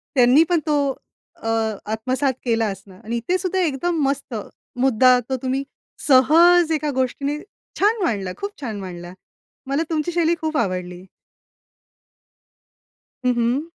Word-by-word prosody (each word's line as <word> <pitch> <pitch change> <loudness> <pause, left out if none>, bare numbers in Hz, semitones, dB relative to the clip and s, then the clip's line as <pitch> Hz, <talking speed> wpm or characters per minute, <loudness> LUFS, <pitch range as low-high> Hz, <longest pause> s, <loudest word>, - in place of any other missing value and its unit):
त्यांनी 255 +4 +6
पण 345 -2 +3
तो 300 - +2 0.7
अ, 225 - -5 0.4
आत्मसात 255 +5 0
केला 230 -1 +1
असनार 195 -1 -8
आणि 230 +2 -3
इथे 295 +11 0
सुद्धा 375 0 -2
एकदम 330 0 0
मस्त 275 -3 -3 0.5
मुद्दा 255 0 +5
तो 265 - 0
तुम्ही 265 +1 -1 0.4
सहज 325 +5 +6
एका 305 -1 0
गोष्टीने 275 +3 -1 0.4
छान 425 +2 +2
मांडला, 200 - -1
खूप 400 +1 -4
छान 220 -6 -4
मांडला. 175 -2 -8 0.5
मला 280 +4 0
तुमची 320 +1 -1
शैली 340 0 +2
खूप 315 -2 -1
आवडली. 180 -3 -3 2.2
हं, 250 - +3
हं. 240 +5 +1
265 Hz, 130 wpm, -21 LUFS, 230-320 Hz, 2.2 s, त्यांनी